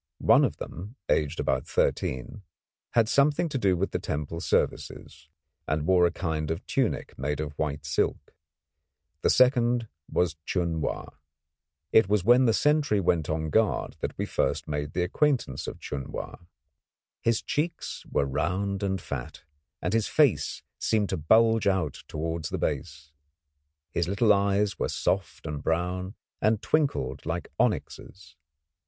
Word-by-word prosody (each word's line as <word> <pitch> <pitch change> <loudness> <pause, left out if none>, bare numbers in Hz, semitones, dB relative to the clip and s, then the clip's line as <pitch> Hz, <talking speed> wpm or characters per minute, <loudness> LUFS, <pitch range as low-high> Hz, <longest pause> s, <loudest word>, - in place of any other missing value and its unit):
One - - +5
of - - 0
them, 100 - -8
aged 75 -2 +1
about - - 0
thirteen, 65 - -1 0.5
had 115 -2 +4
something 145 +6 +3
to 140 -3 -2
do 95 -5 +2
with 95 +3 -1
the - - -1
temple 75 +3 -4
services, 75 - -2 0.4
and 75 0 0
wore 90 -1 +5
a - - -2
kind 80 -3 -2
of 80 +3 -3
tunic 130 -4 -1
made 75 +3 -2
of 75 -1 -3
white 75 -1 -3
silk. 75 - -1 0.9
The - - +2
second 120 -2 +4 0.2
was 85 -2 +1
Chun 85 -2 -1
Wa. - - -3 0.8
It 110 -3 +5
was 105 -3 +2
when 120 +5 +6
the 115 - +4
sentry 145 -6 +2
went 85 -4 +1
on 80 -1 -1
guard 110 -1 +1
that - - -4
we - - -1
first - - -1
made 75 0 -3
the 90 - +1
acquaintance 120 - 0
of - - -6
Chun 70 -2 -5
Wa. - - -6 0.8
His 115 -1 +1
cheeks 165 +3 -3
were - - +1
round 95 +8 -1
and 95 -1 -1
fat, 70 -7 -6 0.4
and 90 - 0
his 115 -2 +2
face 145 -8 +2 0.2
seemed 105 -3 +1
to - - -1
bulge 110 +7 +4
out 90 -7 0
towards 80 +1 -3
the - - -2
base. 75 0 -3 0.8
His 85 - 0
little 105 +3 +4
eyes 100 -1 +1
were - - 0
soft 95 -5 -1
and 75 -2 -4
brown 90 +5 -1 0.3
and 110 0 +3
twinkled 135 - 0
like 80 0 -3
onyxes. 80 -6 -2
95 Hz, 150 wpm, -27 LUFS, 80-110 Hz, 0.9 s, when